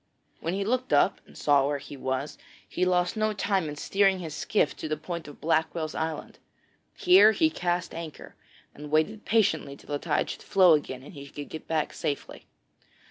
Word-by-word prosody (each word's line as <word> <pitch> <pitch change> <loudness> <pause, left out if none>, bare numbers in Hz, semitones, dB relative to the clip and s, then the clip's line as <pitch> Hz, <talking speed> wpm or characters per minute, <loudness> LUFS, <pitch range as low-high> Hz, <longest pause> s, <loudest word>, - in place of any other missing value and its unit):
When 170 +3 -2
at - - -2
length 200 - -1
he 220 - -1
looked 255 +1 0
up - - +3
and - - -16
saw 140 -2 +3
where 145 0 0
he 140 +1 -10
was, 130 +2 -3 0.3
he 185 - 0
lost 180 -1 +1
no 215 0 +1
time 195 -5 0
in 145 - -6
steering 195 +5 +2
his 165 -4 -6
skiff 205 -3 0
to - - -5
the 155 0 -2
point 165 0 -6
of 145 - -12
Blackwell's 160 0 0
Island. 160 -1 -4 0.6
Here 360 - +6
he 315 +6 +2
cast 175 - -2
anchor, 165 -2 -8 0.4
and 150 +1 -9
waited 160 +8 +1
patiently 200 -10 +1
till - - -19
the 145 - -1
tide - - 0
should - - -8
flow 185 -3 +5
again 130 -4 -1
and 145 - -12
he 140 -2 -9
could 145 +1 -8
get 160 - -8
back 160 -2 -1
safely. 145 - -4
165 Hz, 200 wpm, -27 LUFS, 150-195 Hz, 0.6 s, Here